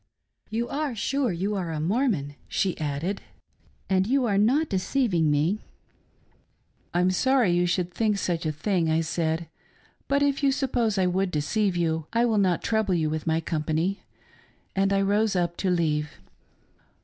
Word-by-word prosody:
You 230 +2 -2
are 285 -3 -2
sure 270 +2 0
you 190 +4 -2
are 185 -4 -2
a 155 - -3
Mormon 180 - 0
.'" - - -31
she 190 -2 0
added, 155 +6 -2 0.3
" - - -36
and 190 0 +2
you 265 +1 +2
are 200 -3 +2
not 270 +10 +3
deceiving 190 - +1
me 155 +8 +1 0.4
?" - - -38
" - - -41
I'm 180 +1 +3
sorry 255 +1 +3
you 175 0 +2
should 175 0 -1
think 215 -3 +1
such 170 -4 -1
a - - +1
thing," 165 +2 0
I 160 +1 +2
said, 165 0 -1 0.3
" - - -35
but 280 +1 +2
if 280 0 +1
you 280 -1 +3
suppose 245 -6 0
I 190 - +3
would 185 +1 +1
deceive 180 +5 0
you, 160 -2 -1
I 235 +1 +3
will 220 -3 +2
not 185 -4 +1
trouble 220 -4 +1
you 155 -2 0
with 155 +1 -4
my 160 0 +1
company." 160 +4 -1 0.7
And 195 0 +2
I 195 0 +2
rose 205 +1 +2
up 175 -1 0
to 190 - 0
leave. 155 -4 +1
185 Hz, 185 wpm, -26 LUFS, 165-220 Hz, 0.7 s, not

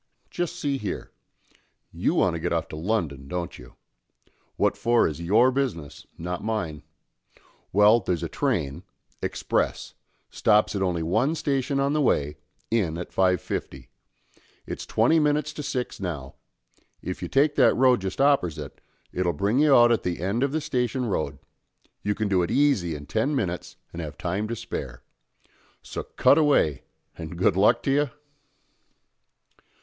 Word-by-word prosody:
Just 175 -1 -2
see 145 -5 -2
here. 105 -5 -5 0.8
You - - 0
want - - +3
to - - -3
get - - -2
off - - 0
to - - -7
London, 80 -7 -2
don't 85 +2 -4
you? - - -14 0.8
What - - +1
for 120 0 +3
is 80 +1 -5
your 110 +9 +4
business, 125 - -3
not 90 +2 -4
mine. 90 -9 -3 0.9
Well, 105 +4 +6
there's 90 -6 -2
a - - -1
train, 70 0 -1 0.4
express, - - -1 0.4
stops 105 -1 +3
at 100 - -1
only 90 -3 0
one 115 - +1
station 140 -2 -1
on 140 +1 +1
the 155 - +1
way, 75 - +1 0.3
in 95 -8 +1
at 90 - -6
5.50. 90 -8 -1 0.8
It's - - -6
twenty 120 +9 +3
minnits 150 0 +1
to 150 - -6
six 125 -3 -3
now. 75 -8 -5 0.7
If - - -5
you - - -3
take 145 +2 +3
that - - +5
road 125 -3 +4
just 95 0 -4
oppersite, 90 - +1 0.3
it'll 90 -1 0
bring 100 - +1
you 150 -2 +5
out 120 -1 +6
at 115 - +2
the 90 -1 -3
end 100 +7 -1
of 140 0 +1
the 155 +2 -1
Station 125 -4 -1
Road; 75 -9 -2 0.6
you 105 0 -1
can 110 - -1
do 95 -2 +2
it 85 - -1
easy 130 - +2
in 75 0 -8
ten 115 - 0
minnits 90 -9 -3 0.2
and 85 - -5
have 75 -2 -7
time 95 +4 -2
to 115 - -3
spare. 65 - -6 0.8
So - - -5
cut - - +3
away, 140 - +3 0.3
and 80 +1 -7
good 90 - +3
luck 110 +5 +4
to 135 - +1
you?" 145 0 +2
105 Hz, 160 wpm, -25 LUFS, 85-135 Hz, 0.9 s, Well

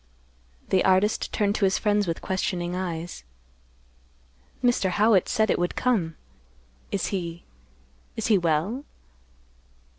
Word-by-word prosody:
The 190 - +3
artist 190 +3 +2
turned 205 -1 +1
to 200 - +2
his 190 - +2
friends 205 -2 +1
with 165 - -3
questioning 180 -2 -2
eyes; 170 - -4 1.4
"Mr. 240 -6 +2
Howitt 205 0 +3
said 220 -1 +2
it - - +1
would 175 0 -1
come. 195 -11 0 0.8
Is 195 - -1
he—is 65 - -8
he 215 -3 +4
well?" 170 - 0
185 Hz, 115 wpm, -25 LUFS, 165-205 Hz, 1.4 s, he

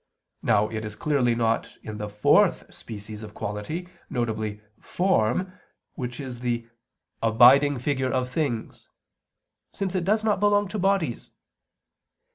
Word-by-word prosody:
Now 105 +1 +3
it 110 0 -5
is 105 -1 -6
clearly 130 -5 +1
not 115 -1 0
in 105 -1 -7
the 105 0 -4
fourth 105 0 +3
species 105 -1 -9
of 105 -1 -10
quality; 105 - -4 0.2
viz. 110 -4 -2 0.2
form 185 - +1 0.4
which 125 -1 -5
is 130 -4 -6
the 120 -1 -2 0.5
"abiding 130 +5 +6
figure 130 0 -1
of 130 -1 0
things," 125 -6 -3 0.8
since 195 -2 -3
it 185 -2 0
does 215 +4 +2
not 210 -3 +2
belong 205 0 +3
to 210 - -3
bodies. 190 -10 0
125 Hz, 130 wpm, -25 LUFS, 110-170 Hz, 0.8 s, abiding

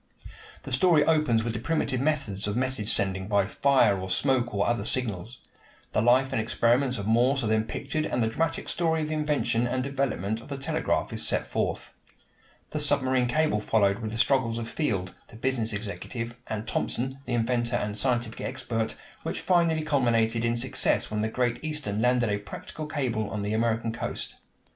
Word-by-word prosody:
The - - -8
story 150 +3 +4
opens 150 -9 +3
with 115 0 -2
the 110 - -3
primitive 130 -1 0
methods 135 -10 -1
of 105 +2 -1
message 130 -4 0
sending 95 -1 +1
by 100 -2 +3
fire 120 -1 +3
or 95 - -5
smoke 120 +4 +1
or 100 -1 +1
other 120 -3 0
signals. 115 -1 -3 0.5
The - - +2
life 130 +3 +4
and 115 - +1
experiments 120 +3 +2
of 100 - -4
Morse 125 +5 +3
are - - 0
then 110 0 +2
pictured 155 +6 -3
and 125 - 0
the - - +2
dramatic 165 +8 -1
story 160 -2 0
of 150 - -3
the - - -1
invention 150 -6 +1
and 130 +1 -1
development 130 -6 -1
of - - -13
the 140 -2 -5
telegraph 155 +4 -1
is - - -2
set - - 0
forth. - - -3 0.8
The 150 - -2
submarine 130 -4 +2
cable 155 -3 +2
followed 100 -1 +2
with 110 -2 -4
the 115 - -4
struggles 120 -2 +2
of 115 -1 -4
Field, 100 - -2
the - - -15
business 120 -1 0
executive, 115 +3 -5
and 110 0 -4
Thomson, 130 +2 -1
the 125 - -2
inventor 120 +1 +1
and 105 -3 -1
scientific 120 0 0
expert, 120 -4 -2 0.3
which - - -3
finally 170 -3 +2
culminated 120 -6 +2
in 115 0 +1
success 130 -1 +1
when 105 0 -1
the 110 - +1
Great 120 +2 -1
Eastern 150 -10 -2
landed 125 -1 +3
a 105 - 0
practical 150 +8 -8
cable 120 -8 -1
on 105 -2 -3
the 105 +1 -1
American 115 0 +1
coast. 120 - -3
120 Hz, 185 wpm, -27 LUFS, 110-135 Hz, 0.8 s, story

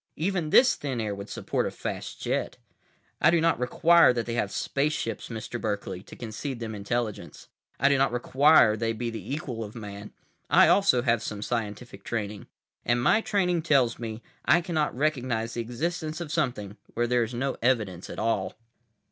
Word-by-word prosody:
Even 175 -1 -1
this 255 +10 +6
thin 135 -4 -4
air 105 -2 -2
would 100 +1 -8
support - - -2
a - - -2
fast - - -6
jet. - - -2 0.6
I - - +6
do 170 +1 +4
not 165 -5 +2
require 165 +3 +5
they 120 -1 -2
have 105 -4 -1
spaceships, 140 -3 -2
Mr. 115 +1 -5
Berkeley, 100 -3 -3
to - - -13
concede 120 +3 -5
them 115 -2 -5
intelligence. 105 +2 -4 0.3
I - - +4
do 140 -1 +3
not 135 -1 +3
require 125 -1 +5
they 115 +1 -1
be 115 +1 -3
the 115 +3 -7
equal 130 -6 -4
of 105 +1 -9
Man. 105 -2 -8 0.4
I - - +7
also 160 -12 +4
have 115 -3 +2
some 105 -1 -5
scientific 110 -2 -4
training. 105 -3 -4 0.4
And 120 +1 +1
my 220 - +4
training 180 -6 +1
tells 135 -7 +2
me 115 -1 -6 0.2
I 170 - +5
cannot 160 -7 -1
recognize 125 -6 -1
the 120 - -2
existence 155 +7 -3
of 165 -4 -6
something 115 - -2 0.2
where 120 - +1
there 120 0 +2
is 115 +1 -2
no 135 +2 -2
evidence 110 -8 0
at - - -7
all." 100 -4 -1
120 Hz, 180 wpm, -27 LUFS, 110-150 Hz, 0.6 s, I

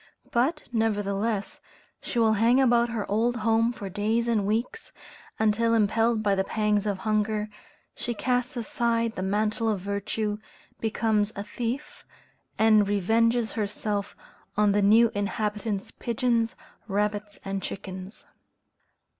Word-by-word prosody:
But, 275 +7 +1
nevertheless, 205 -2 -1 0.4
she - - -5
will 225 -2 +4
hang 230 +4 +4
about 240 -2 +4
her 225 -3 -2
old 230 +4 +1
home 225 +1 +2
for 205 -4 -7
days 215 +4 0
and 215 -4 +1
weeks, 235 - -2 0.5
until, 230 +2 +2
impelled 225 +1 +2
by 205 -1 +3
the 190 0 +1
pangs 210 0 0
of 200 -2 0
hunger, 215 +1 0 0.4
she 240 - -4
casts 250 +3 -1
aside 230 0 0
the 185 - -5
mantle 215 +4 0
of 210 -3 0
virtue, 205 +2 -2 0.4
becomes 220 -1 +1
a 200 - -4
thief, 240 +6 -5 0.5
and 215 -2 +5
revenges 225 +4 +2
herself 205 -1 -3 0.4
on 210 -1 +4
the 205 +1 +2
new 225 +3 +5
inhabitant's 205 0 -2
pigeons, 235 -1 0 0.3
rabbits, 205 0 -1
and 195 0 -3
chickens. 190 +1 -7
215 Hz, 130 wpm, -26 LUFS, 205-230 Hz, 0.5 s, and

